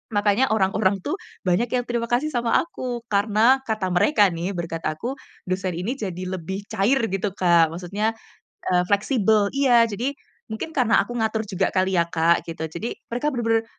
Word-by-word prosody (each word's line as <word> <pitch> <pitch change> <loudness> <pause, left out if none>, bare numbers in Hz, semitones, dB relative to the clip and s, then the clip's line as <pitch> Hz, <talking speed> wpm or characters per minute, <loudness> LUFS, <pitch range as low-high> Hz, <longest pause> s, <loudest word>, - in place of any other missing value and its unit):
makanya 205 +5 +2
orang-orang 195 -1 +1
tuh 305 - -2 0.3
banyak 185 +7 +2
yang 245 - +1
terima 235 -1 -1
kasih 255 +6 +1
sama 240 -2 +1
aku 250 -7 -4
karena 215 +6 +4
kata 215 -4 -1
mereka 205 +1 +4
nih, 170 +3 -3
berkat 165 -1 -4
aku 235 - -3 0.3
dosen 185 0 -1
ini 200 +10 -3
jadi 185 -3 -4
lebih 190 +2 -5
cair 240 +8 +2
gitu, 195 +1 -1
Kak. 170 -3 +4
Maksudnya, 200 +6 -2 0.6
eee, 180 -1 +3
fleksibel 210 0 +2
iya. 255 -4 +5
Jadi 230 +6 -2 0.4
mungkin 220 +9 -4
karena 240 -4 +3
aku 240 - -8
ngatur 220 0 0
juga 195 -1 0
kali 190 0 +2
ya, - - +4
Kak, 170 0 +2
gitu, 160 -1 -4
jadi 170 +9 -5 0.2
mereka 270 +6 -1
bener-bener 225 -2 +1
205 Hz, 170 wpm, -23 LUFS, 185-240 Hz, 0.6 s, iya